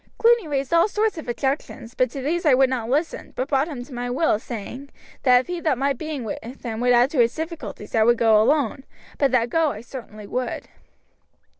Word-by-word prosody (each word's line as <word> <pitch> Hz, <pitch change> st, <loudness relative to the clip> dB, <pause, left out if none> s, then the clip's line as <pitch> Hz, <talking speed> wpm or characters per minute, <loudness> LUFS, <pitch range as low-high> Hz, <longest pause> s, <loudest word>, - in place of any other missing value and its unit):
Cluny 465 Hz, -5 st, +4 dB
raised 275 Hz, 0 st, -2 dB
all 335 Hz, +3 st, +5 dB
sorts 425 Hz, -3 st, 0 dB
of 310 Hz, -, -9 dB
objections, 265 Hz, -2 st, -3 dB
but 255 Hz, -1 st, +1 dB
to 265 Hz, +2 st, -6 dB
these 340 Hz, +5 st, -1 dB
I 295 Hz, -6 st, +5 dB
would 265 Hz, 0 st, +3 dB
not 235 Hz, -3 st, -2 dB
listen, 300 Hz, +6 st, -2 dB
but 255 Hz, -, -2 dB
brought 275 Hz, +1 st, +2 dB
him 275 Hz, -7 st, -6 dB
to 270 Hz, -, -13 dB
my 245 Hz, 0 st, -3 dB
will 275 Hz, +7 st, +1 dB
by -, -, +3 dB
saying, 245 Hz, +4 st, -7 dB, 0.3 s
that 250 Hz, -2 st, +5 dB
if -, -, -14 dB
he 355 Hz, -1 st, -4 dB
thought 305 Hz, -6 st, +1 dB
my 275 Hz, +2 st, +1 dB
being 295 Hz, 0 st, -5 dB
with 215 Hz, -, -4 dB, 0.2 s
him 225 Hz, -3 st, -4 dB
would 245 Hz, +1 st, +2 dB
add 245 Hz, +3 st, +4 dB
to 290 Hz, -, -1 dB
his 235 Hz, -1 st, +3 dB
difficulties 315 Hz, -, -6 dB
I 225 Hz, -, +3 dB
would 235 Hz, +2 st, +4 dB
go 220 Hz, -2 st, +5 dB
alone, 270 Hz, +1 st, +1 dB, 0.4 s
but 275 Hz, -, +4 dB
that 240 Hz, -2 st, +1 dB
go 325 Hz, -2 st, +3 dB
I 215 Hz, -, -8 dB
certainly 230 Hz, -4 st, -10 dB
would. 250 Hz, +4 st, -4 dB
260 Hz, 230 wpm, -23 LUFS, 240-305 Hz, 0.4 s, all